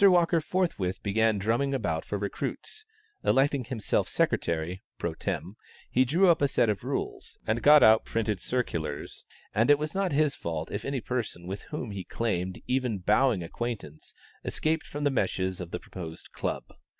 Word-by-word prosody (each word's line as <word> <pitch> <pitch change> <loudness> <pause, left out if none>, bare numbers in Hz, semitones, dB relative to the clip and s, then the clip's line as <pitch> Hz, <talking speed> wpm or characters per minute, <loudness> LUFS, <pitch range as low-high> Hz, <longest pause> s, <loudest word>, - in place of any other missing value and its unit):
Walker 175 -3 +6
forthwith 150 - -1
began 110 +1 +2
drumming 115 +7 +1
about 85 -10 -1
for 105 - -2
recruits; 105 - -4 0.4
electing 135 -1 +3
himself 115 -4 0
secretary, 85 +3 0 0.2
pro - - -2
tem., 100 +5 -4 0.3
he 130 +1 +4
drew 170 +9 +4
up 170 -4 +5
a 140 - +5
set 115 -4 +3
of 100 - -5
rules, - - -4
and 110 +2 0
got 150 +1 +8
out 110 0 +7
printed 110 -3 -1
circulars, 85 - -3 0.3
and 115 +5 +3
it 145 - +8
was 150 +1 -3
not 195 -1 0
his 150 0 +3
fault 80 -1 -4
if 100 - -4
any 140 -3 -1
person 115 -8 -3
with 95 +3 -5
whom 130 -7 -4
he 100 -2 -5
claimed 95 -6 -2
even 125 -4 0
bowing 105 +1 +3
acquaintance, 100 -5 -5 0.3
escaped 160 0 -1
from 145 0 -5
the 145 - +3
meshes 95 -6 0
of 90 - -6
the 90 - -4
proposed 85 -3 -9
club. - - -3
115 Hz, 170 wpm, -28 LUFS, 95-140 Hz, 0.4 s, got